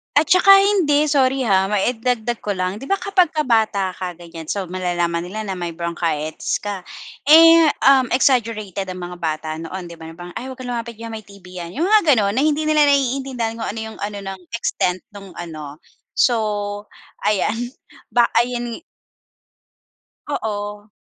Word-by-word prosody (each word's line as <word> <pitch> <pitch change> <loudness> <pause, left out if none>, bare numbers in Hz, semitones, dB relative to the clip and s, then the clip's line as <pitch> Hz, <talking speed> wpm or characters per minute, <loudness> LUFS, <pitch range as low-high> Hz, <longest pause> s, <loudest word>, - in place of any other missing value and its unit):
At 295 +1 +3
saka 365 +1 +4
hindi, 375 -7 +5
sorry 265 -2 +2
ha, 195 -3 +3
maidagdag 230 +3 -1
ko 205 -2 -3
lang. 185 +3 -2
'Di 270 - -9
ba 395 - +2
kapagka 360 -6 +1
bata 215 -5 +1
ka 180 -2 -6
ganiyan, 165 -2 -10
so 200 -2 -2
malalaman 175 -2 -1
nila 215 +3 -5
na 190 -3 -5
may 170 -1 -4
bronchitis 165 -2 -2
ka, 205 -2 -3 0.5
eh, 330 +1 +8 0.2
um, 265 -2 +6
exaggerated 215 -7 0
ang 180 -1 -6
mga 175 0 -7
bata 155 0 -3
noon 175 +1 -7
'di 165 - -12
ba, 160 - -9
na 165 - -10
parang, 175 0 -9
"Ay 255 - -7
huwag 260 - -7
kang 245 -1 -6
lumapit 235 -1 -4
diyan 230 +1 -8
may 220 - -5
TB 195 -3 -12
'yan. 170 +4 -8
"Yung 320 - -1
mga 375 -8 +5
gano'n, 200 -2 +2
na 245 - -1
hindi 305 +1 +2
nila 305 -1 +4
naiintindihan 260 -4 0
kung 225 - -3
ano 225 +2 -4
'yung - - -12
ano 205 0 -4
ng 195 -1 -6 0.2
extent 180 -5 -1
nung 195 -3 -12
ano. 155 -3 -8 0.3
So, 240 -3 +3 0.9
ayan 225 +5 0 0.3
ba 240 -1 +3 0.2
ayan 240 0 -2 1.5
Oo. 210 -4 -4
215 Hz, 170 wpm, -20 LUFS, 180-260 Hz, 1.5 s, eh